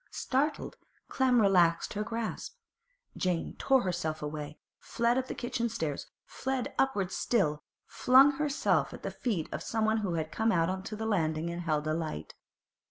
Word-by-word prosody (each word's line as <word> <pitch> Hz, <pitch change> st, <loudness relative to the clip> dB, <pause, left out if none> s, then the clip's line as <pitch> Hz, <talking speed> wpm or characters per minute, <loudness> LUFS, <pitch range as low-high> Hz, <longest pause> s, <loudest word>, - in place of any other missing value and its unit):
Startled, 280 Hz, +4 st, -1 dB, 0.3 s
Clem 255 Hz, -2 st, +3 dB
relaxed 175 Hz, -5 st, +3 dB
her 210 Hz, -, -2 dB
grasp. 225 Hz, +1 st, -4 dB, 0.6 s
Jane 180 Hz, -3 st, -1 dB
tore 265 Hz, -2 st, +3 dB
herself 170 Hz, -4 st, -2 dB
away, 150 Hz, 0 st, -5 dB, 0.2 s
fled 235 Hz, +1 st, 0 dB
up 260 Hz, 0 st, -1 dB
the -, -, -5 dB
kitchen 235 Hz, -1 st, -2 dB
stairs, 160 Hz, -10 st, -3 dB, 0.2 s
fled 265 Hz, -2 st, -3 dB
upwards 200 Hz, -9 st, +1 dB
still, 150 Hz, -11 st, +1 dB, 0.2 s
flung 265 Hz, +3 st, +5 dB
herself 295 Hz, -1 st, +1 dB
at -, -, -13 dB
the -, -, -3 dB
feet 200 Hz, -11 st, -2 dB
of -, -, -4 dB
someone 220 Hz, 0 st, 0 dB
who 195 Hz, -6 st, -1 dB
had 160 Hz, -1 st, -3 dB
come 225 Hz, 0 st, +1 dB
out 165 Hz, -3 st, +2 dB
on 190 Hz, 0 st, -2 dB
to 215 Hz, +3 st, -6 dB
the 220 Hz, +1 st, -4 dB
landing 165 Hz, -5 st, 0 dB
and 170 Hz, +1 st, -4 dB
held 155 Hz, -3 st, -1 dB
a 155 Hz, -, 0 dB
light. 155 Hz, -, -4 dB
200 Hz, 165 wpm, -30 LUFS, 165-235 Hz, 0.6 s, flung